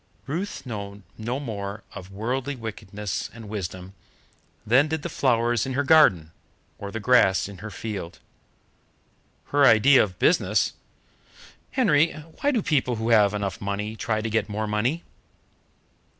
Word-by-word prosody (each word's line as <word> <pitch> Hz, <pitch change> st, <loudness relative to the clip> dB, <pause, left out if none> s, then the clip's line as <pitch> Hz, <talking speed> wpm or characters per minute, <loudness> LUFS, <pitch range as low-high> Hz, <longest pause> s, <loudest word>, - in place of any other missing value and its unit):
Ruth 175 Hz, +7 st, -4 dB
knew 100 Hz, -4 st, -7 dB
no 120 Hz, +4 st, -3 dB
more 105 Hz, -6 st, -5 dB
of 95 Hz, 0 st, -9 dB
worldly 125 Hz, +7 st, -3 dB
wickedness 105 Hz, -3 st, -5 dB
and 115 Hz, -2 st, -10 dB
wisdom 95 Hz, -2 st, -6 dB, 0.7 s
than 130 Hz, +7 st, +4 dB
did 160 Hz, -1 st, -3 dB
the 170 Hz, -, -3 dB
flowers 120 Hz, -5 st, +1 dB
in 130 Hz, -, -3 dB
her 140 Hz, +2 st, +1 dB
garden, 135 Hz, -, +5 dB, 0.5 s
or 100 Hz, -, -6 dB
the 115 Hz, -, -5 dB
grass 105 Hz, -5 st, +3 dB
in 100 Hz, -2 st, -11 dB
her 110 Hz, +3 st, -7 dB
field. 95 Hz, -1 st, -6 dB, 1.3 s
Her 145 Hz, 0 st, +3 dB
idea 130 Hz, +2 st, +6 dB
of 95 Hz, -3 st, -2 dB
business 175 Hz, -, +2 dB, 1.0 s
"Henry, 165 Hz, -, +3 dB, 0.3 s
why 285 Hz, -, +2 dB
do 240 Hz, -8 st, 0 dB
people 130 Hz, -5 st, +1 dB
who 110 Hz, +1 st, -3 dB
have 105 Hz, -3 st, +4 dB
enough 100 Hz, -3 st, -3 dB
money 105 Hz, +2 st, -3 dB
try 110 Hz, -1 st, -1 dB
to 115 Hz, -, -3 dB
get 115 Hz, 0 st, 0 dB
more 105 Hz, +1 st, -2 dB
money?" 115 Hz, +10 st, -1 dB
110 Hz, 145 wpm, -25 LUFS, 100-135 Hz, 1.3 s, idea